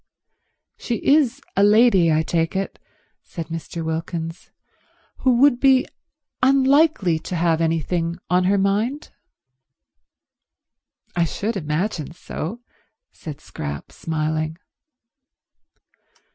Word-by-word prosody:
"She 240 - -3
is 280 -2 +3
a 195 - +3
lady, 205 -5 +5
I 155 +1 +2
take 165 +1 -1
it," 195 0 -3 0.4
said 165 -2 -8
Mr. 165 0 -5
Wilkins, 165 +1 -4 0.7
"who 255 -2 +2
would 275 -3 +5
be 265 -1 +4 0.6
unlikely 270 - +3
to 180 - -5
have 165 -1 +1
anything 165 +1 -1
on 180 0 +2
her 200 +2 +3
mind?" 210 +9 0 2.0
"I 170 -1 +2
should 210 +7 -3
imagine 165 -1 -2
so," 180 +5 -6 0.5
said 150 -2 -9
Scrap, 70 - -7
smiling. 155 0 -2
175 Hz, 100 wpm, -22 LUFS, 160-235 Hz, 2.0 s, lady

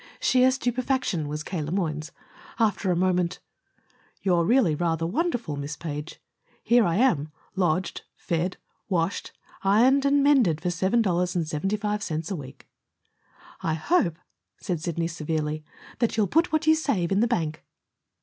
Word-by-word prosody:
Sheer 255 0 +4
stupefaction 255 - -1
was 150 +1 -4
K. 175 -2 -4
Le 150 +1 -4
Moyne's. 160 -4 -2 0.5
After 210 -4 +1
a - - +2
moment: 180 -1 +1 0.9
"You're 175 -3 +3
really 230 -6 +4
rather 165 +1 0
wonderful, 235 - -1
Miss 145 +1 -5
Page. 150 -1 -6 0.4
Here 240 0 +5
am 180 - +3
I, 145 - -6 0.3
lodged, 180 -1 0
fed, 175 +2 -2 0.3
washed, 175 -1 -1 0.3
ironed, 245 +8 +4
and 280 0 +4
mended 250 - +4
for 175 +2 -1
seven 190 +7 +2
dollars 180 -2 0
and 170 -3 0
seventy 195 +7 -1
five 210 0 -2
cents 160 -1 -3
a - - -1
week!" 135 -3 -10 0.9
"I 160 -1 0
hope," 170 - +1 0.4
said 175 -6 -3
Sidney 170 0 -1
severely, 155 -2 -3 0.4
"that 235 -2 0
you'll 215 - +4
put 325 - +2
what 310 0 +1
you 315 - +6
save 245 - 0
in 195 - +3
the 235 - +3
bank." 160 -10 -2
180 Hz, 155 wpm, -26 LUFS, 160-235 Hz, 0.9 s, you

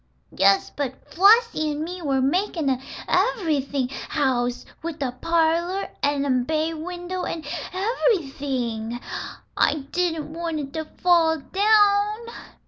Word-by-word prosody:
"Yes, 195 +1 +4
but 265 -2 -5
Flossie 405 -3 +5
and 300 +1 -2
me 360 +2 -6
were 270 -4 +1
makin' 325 -1 +1
an 260 -1 -1 0.3
ev'rything 305 - +1 0.2
house, 250 -4 0 0.2
with 325 -1 -5
a 270 -3 -1
parlor, 335 +6 0
an' 285 0 +1
a 255 -3 +2
bay 315 +4 0
window, 355 +3 -5
an' 325 - -4 0.3
ev'rything. 275 - -1 0.6
I - - +3 0.2
didn't 325 -3 -1
want 330 -1 -3
it 275 -1 -6
to 315 -1 -3
fall 330 -1 +3
down." 410 +4 +3
320 Hz, 125 wpm, -24 LUFS, 275-360 Hz, 0.6 s, Flossie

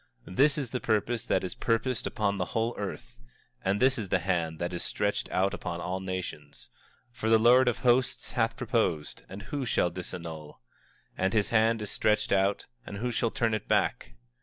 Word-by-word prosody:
24:26 90 - -9
This 145 +2 +5
is 135 -5 -2
the 125 - -1
purpose 110 +1 0
that 95 - +1
is 95 - -3
purposed 115 +1 0
upon 100 -3 -1
the 90 - 0
whole 115 +2 +1
earth; 100 -2 -6 0.4
and 95 +2 +1
this 130 -1 +3
is 100 -4 -4
the 95 - +3
hand 85 -3 -1
that 85 +2 -3
is 90 - -3
stretched 105 0 -1
out 95 +1 +1
upon 85 - -4
all 90 +2 -3
nations. 95 -6 -6 0.4
24:27 - - -28
For 110 - 0
the 115 - +7
Lord 120 +3 +6
of 120 - +2
Hosts 125 +1 +1
hath 115 -1 0
purposed, 110 - -1
and 100 +1 -8
who 140 +6 -3
shall 95 -7 +1
disannul? 85 -3 -7 0.6
And 95 +1 0
his 105 -2 +2
hand 115 -1 +3
is 105 - -4
stretched 105 0 +1
out, 100 +1 +2 0.2
and 100 - -7
who 120 +4 -2
shall 115 0 +1
turn 115 0 0
it 110 - -3
back? - - 0
105 Hz, 200 wpm, -29 LUFS, 95-115 Hz, 0.6 s, the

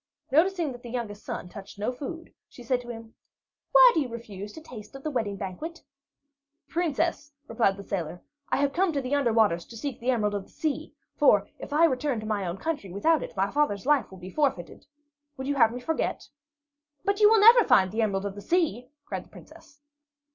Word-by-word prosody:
Noticing 335 +1 +2
that 245 -1 -10
the 240 - -9
youngest 225 -4 -5
son - - -5
touched 200 +2 -11
no 210 +4 -1
food, 325 +6 -8 0.2
she 245 - -13
said 245 +1 0
to 240 - -12
him: 225 -1 -9 0.6
"Why - - +9
do 325 - +2
you 265 - -3
refuse 210 -4 -8
to - - -9
taste 250 -6 -11
of 270 - -10
the 310 - -2
wedding 220 -6 -1
banquet?" 210 - -6 0.8
"Princess," 330 -2 -1 0.2
replied 220 -4 +1
the 200 - -8
sailor, 175 -3 -4 0.3
"I - - +1
have 280 0 +1
come 370 0 +2
to 280 - 0
the 255 +2 -3
Under 280 -5 +2
Waters 210 -7 +3
to 230 - -10
seek 270 +1 -5
the 245 - -2
Emerald 215 -5 +1
of 200 -2 -3
the - - -23
Sea; 310 0 -3 0.2
for - - +4
if - - -8
I 310 +3 +5
return 270 -4 0
to 215 - -7
my 205 -3 -1
own 175 +2 -4
country 290 - -4
without 315 - +2
it, - - -8
my 195 +1 +1
father's 285 -9 0
life 285 -6 +3
will 190 - -12
be 185 +1 -9
forfeited. 270 - -2 0.5
Would 265 - -5
you 285 - 0
have 230 -5 +4
me 245 - -5
forget?" 320 +6 -2 0.8
"But 400 +1 +1
you 420 -1 +7
will 445 0 +5
never 460 +3 +8
find 190 - +4
the 225 +2 -1
Emerald 200 -2 0
of 200 - -3
the 205 - -9
Sea!" 300 - 0 0.2
cried - - -5
the - - -23
Princess. 285 -1 -16
250 Hz, 220 wpm, -27 LUFS, 205-300 Hz, 0.8 s, Why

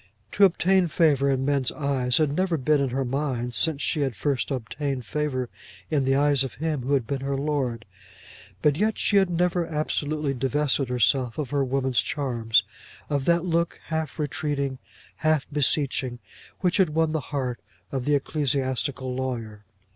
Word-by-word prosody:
To 200 - +6
obtain 185 0 +3
favour 145 -4 +3
in 135 -1 +1
men's 140 -3 +1
eyes 135 -4 0
had 150 -2 +2
never 185 -2 +1
been 145 +1 +2
in 135 - +1
her 130 +2 -1
mind 125 -2 -2
since 145 +5 0
she 155 - 0
had 135 -5 0
first 140 0 -1
obtained 135 0 -3
favour 130 +1 -2 0.4
in 145 -4 +2
the 135 0 +3
eyes 140 -1 +3
of 135 - -6
him 155 -1 -2
who 135 +3 +1
had 130 -4 0
been 135 +3 -3
her 135 0 -1
lord; 135 -5 -1 0.8
but 150 -1 +3
yet 215 +4 +1
she 205 - +2
had 190 -2 +4
never 175 0 +1
absolutely 150 -1 -1
divested 135 +1 0
herself 125 0 +2
of 145 -5 -3
her 140 -1 +2
woman 130 0 -1
charms, 120 -6 +1 0.5
of 140 -2 0
that 170 0 +3
look 170 -1 0
half 160 -3 -2
retreating, 140 -2 -2 0.4
half 155 -3 +2
beseeching, 140 -3 +1 0.4
which 180 -2 +2
had 190 -5 +4
won 160 +1 +1
the 160 - 0
heart 130 -4 -2 0.3
of 130 -2 -2
the 145 0 +3
ecclesiastical 135 -2 0
lawyer. 115 -5 -4
140 Hz, 170 wpm, -25 LUFS, 130-155 Hz, 0.8 s, To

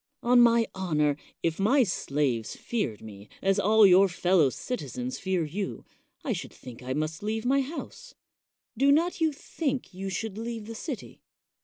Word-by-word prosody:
On 245 0 +6
my 235 -1 +5
honor, 150 -6 +1 0.3
if 165 +1 0
my 255 +7 +4
slaves 140 - -1
feared 175 - -3
me 105 -2 -11
as 195 0 +2
all 215 +1 +6
your 190 +1 +6
fel 180 +1 +1
low 150 -5 +5
citizens 250 - -5
fear 185 -3 0
you, 190 +6 -5 0.4
I - - 0
should - - -6
think 125 -1 -12
I 130 +1 -3
must 155 +2 -3
leave 220 +2 -2
my 275 +2 +3
house. 340 - -7 0.6
Do 275 +4 +4
not 335 +4 +2
you 320 -1 +3
think 280 - -4
you 195 +1 -5
should 210 +2 -4
leave 230 -1 -5
the 230 - -7
city? 255 +2 -7
205 Hz, 170 wpm, -28 LUFS, 160-245 Hz, 0.6 s, On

